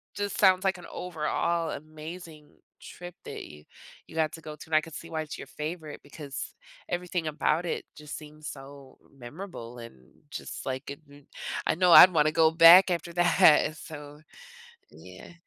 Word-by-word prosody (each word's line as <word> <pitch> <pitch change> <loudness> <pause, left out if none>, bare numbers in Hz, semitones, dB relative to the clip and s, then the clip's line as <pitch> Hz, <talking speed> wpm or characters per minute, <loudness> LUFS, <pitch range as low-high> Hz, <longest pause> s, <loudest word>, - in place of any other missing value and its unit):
just 205 0 -3
sounds 185 -2 +5
like 190 -1 +1
an - - -11
overall 170 0 -2
amazing 155 +1 -10 0.3
trip 175 0 -10
that - - -7
you 75 0 -14 0.4
you - - -14
got 160 -2 +1
to 165 - -9
go 155 -1 -8
to - - -12
and 160 - -1
I 155 - +5
could 160 0 -12
see 165 - -9
why 160 -1 -3
it's 155 - -7
your 135 - -9
favorite 155 0 -7
because 145 -1 -8 0.4
everything 175 -2 -3
about 155 +2 0
it 170 - -3
just 150 -1 -8
seems 150 0 -13
so 135 -1 -11 0.2
memorable 125 -2 -9
and 115 - -11 0.4
just - - -7
like 130 +2 -5
it 140 - -9
it 145 0 -17 0.4
I - - +1
know 180 0 +4
I'd 185 - +11
wanna 155 -2 +3
go 160 -1 +5
back 170 +3 +8
after 170 0 -3
that, 175 +1 +1
and 155 -2 +6
so, 150 -1 -11 0.7
yeah. - - -13
155 Hz, 180 wpm, -27 LUFS, 150-175 Hz, 0.7 s, I'd